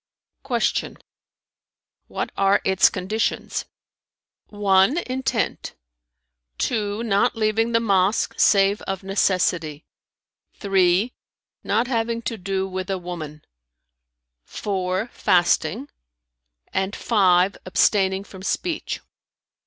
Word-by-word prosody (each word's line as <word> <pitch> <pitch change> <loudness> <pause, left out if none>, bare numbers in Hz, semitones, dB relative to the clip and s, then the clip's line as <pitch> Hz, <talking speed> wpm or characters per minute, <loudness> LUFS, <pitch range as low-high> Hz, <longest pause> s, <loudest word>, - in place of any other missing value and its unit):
Q 250 -3 -1 1.5
"What - - -4
are 195 +1 +3
its 190 0 +4
conditions?" 200 +5 -2 0.8
"(1) 205 - +3
intent; 260 -5 -2 0.8
(2) 215 -2 -1
not 200 -3 +2
leaving 225 +1 +1
the 230 - +3
mosque 200 -2 +1
save 200 0 +3
of 195 0 -3
necessity; 180 -5 0 0.7
(3) 195 +3 +2 0.5
not 235 - +1
having 230 -1 -1
to 230 - -3
do 190 +1 -2
with 185 0 -5
a 195 - -1
woman; 165 -4 -8 1.0
(4) 190 +2 -3
fasting; 175 - +1 0.9
and 190 +1 -1
(5) 190 -3 +3
abstaining 190 0 +2
from 190 -2 -12
speech." 320 - -3
195 Hz, 90 wpm, -23 LUFS, 185-225 Hz, 1.5 s, its